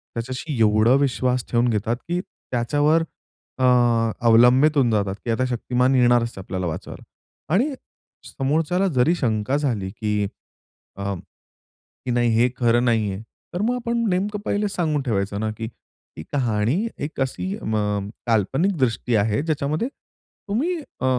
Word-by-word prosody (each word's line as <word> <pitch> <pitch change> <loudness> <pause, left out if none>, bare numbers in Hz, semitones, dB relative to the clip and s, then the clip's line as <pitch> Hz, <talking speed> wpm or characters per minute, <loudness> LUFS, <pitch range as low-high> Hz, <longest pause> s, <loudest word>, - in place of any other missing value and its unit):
त्याच्याशी 130 +5 -4
एवढा 110 +2 +4
विश्वास 125 -2 0
ठेवून 120 0 +3
घेतात, 110 +1 0
की 175 +1 -1
त्याच्यावर 145 +5 0 0.6
अ, - - 0 0.6
अवलंबित 125 +6 +6
होऊन 125 -4 +3
जातात, 100 -2 0
की 120 - 0
आता 130 +3 +1
शक्तिमान 125 +2 +1
येणारच 120 -2 +3
आपल्याला 95 -1 -4
वाचवायला. 80 - -6 0.5
आणि 260 +10 +2 0.5
समोरच्याला 160 +7 0
जरी 130 +8 +4
शंका 120 -2 0
झाली, 115 -10 -1
की 105 0 -1 0.7
अं, 100 -2 -3 0.7
की 125 - -8
नाही 120 0 +2
हे 120 +2 +4
खरं 120 0 +3
नाहीये, 110 -4 0 0.3
तर 175 - -2
मग 240 +4 +1
आपण 235 -1 -2
नेमकं 200 +3 -1
पहिले 205 0 0
सांगून 160 -6 0
ठेवायचं 100 -5 -1
ना, 110 0 -1
की 115 - -4
ती 95 -7 -15
कहाणी 125 - +1
एक 145 +1 -5
अशी 185 +9 -2
अ, - - -13
म 105 -2 -1 0.2
काल्पनिक 130 - +1
दृष्टी 125 -2 0
आहे, 105 +2 +2
ज्याच्यामध्ये 155 - -1
तुम्ही 260 - -5
अ, 275 - -7
125 Hz, 140 wpm, -23 LUFS, 110-155 Hz, 0.7 s, अवलंबित